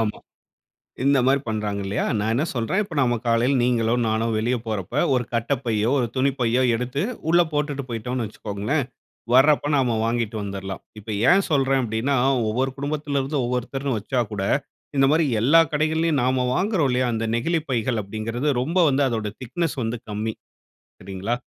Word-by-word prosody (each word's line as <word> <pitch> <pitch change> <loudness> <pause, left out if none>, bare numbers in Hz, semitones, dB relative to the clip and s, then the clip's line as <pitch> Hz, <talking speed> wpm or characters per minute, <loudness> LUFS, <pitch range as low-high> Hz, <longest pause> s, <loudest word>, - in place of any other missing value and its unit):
ஆமா. 110 -2 -1 0.9
இந்த 140 0 +4
மாரி 140 +1 +4
பண்றாங்க 105 -2 -2
இல்லையா. 100 +3 -1
நான் 110 +2 0
என்ன 135 +6 +1
சொல்றேன். 155 - 0
இப்போ 170 -5 -9
நாம 120 -3 +2
காலையில 120 +4 +3
நீங்களோ 120 -2 +2
நானோ 110 +1 0
வெளியில 120 +3 0
போறப்ப 105 -4 -4 0.2
ஒரு 125 -1 +1
கட்டப்பையோ 115 -2 0
ஒரு 120 - 0
துணிப்பையோ 130 -2 +1
எடுத்து 125 +5 -2 0.3
உள்ள 175 +1 +5
போட்டுட்டு 145 -2 -1
போய்ட்டோன்னு 120 +1 -3
வச்சுக்கோங்களேன், 105 +8 -2 0.5
வர்றப்ப 145 +2 +5
நாம 125 -4 +1
வாங்கிட்டு 115 -1 -1
வந்தர்லாம். 95 -1 -6 0.2
இப்ப 105 - -21 0.2
ஏன் 195 +1 +5
சொல்றேன் 135 -2 +2
அப்படின்னார 125 +4 +1 0.2
ஒவ்வொரு 130 +4 0
குடும்பத்துல 145 0 -2
இருந்து 140 +2 -2
ஒவ்வொருத்தர்னு 125 +1 -2
வச்சாகூட, 105 -3 -2 0.5
இந்த 135 0 +5
மாரி 160 0 +3 0.2
எல்லா 155 +7 +6
கடைகள்லயும், 155 -1 +1
நாம 130 0 +1
வாங்குறோம் 185 -6 +1
இல்லயா, 125 0 +1
அந்த 115 0 -1
நெகிழிப் 160 +5 -1
பைகள் 115 -1 0
அப்படிங்கறது 115 +7 -3
ரொம்ப 165 +7 -1
வந்து 140 +1 +2
அதோட 110 -3 -2
திக்னெஸ் 145 +6 -2
வந்து 115 +2 -2
கம்மி. 110 +2 -2 0.7
சரிங்களா, 95 +5 -3
125 Hz, 155 wpm, -23 LUFS, 110-140 Hz, 0.9 s, எல்லா